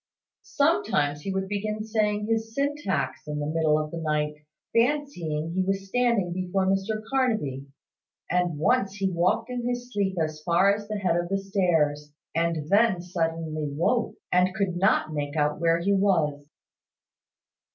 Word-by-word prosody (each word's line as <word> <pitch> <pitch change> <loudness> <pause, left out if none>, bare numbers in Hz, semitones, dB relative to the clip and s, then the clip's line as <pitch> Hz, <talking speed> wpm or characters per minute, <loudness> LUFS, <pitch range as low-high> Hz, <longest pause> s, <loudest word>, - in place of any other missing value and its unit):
Sometimes 285 - +1
he 195 - -3
would 190 0 -2
begin 210 +1 -2
saying 210 -1 0
his 225 0 -1
syntax 275 - -1
in 150 0 -3
the 145 - -2
middle 155 0 +2
of 155 0 -3
the 170 - -4
night, 150 -1 0 0.4
fancying 230 - 0
he 190 - +1
was 195 +1 -1
standing 235 -5 +1
before 185 +1 -1
Mr 195 +3 0
Carnaby; 220 - 0 0.6
and 175 -3 0
once 195 +4 +1
he 195 -2 0
walked 185 +7 +1
in 245 -1 -3
his 245 0 -4
sleep 195 -2 0
as 155 -1 -2
far 180 +4 +4
as 205 0 -5
the 215 0 -3
head 185 -4 +1
of 175 0 -1
the 195 - +1
stairs, 165 -7 0 0.2
and 165 -2 0
then 205 -2 +4
suddenly 165 -3 -2
woke, 195 - 0 0.2
and 180 +1 +3
could 195 -4 0
not 175 -4 +2
make 145 0 -3
out 150 -1 +1
where 165 0 +3
he 195 +4 +1
was. 160 -8 +1
185 Hz, 160 wpm, -26 LUFS, 155-215 Hz, 0.6 s, far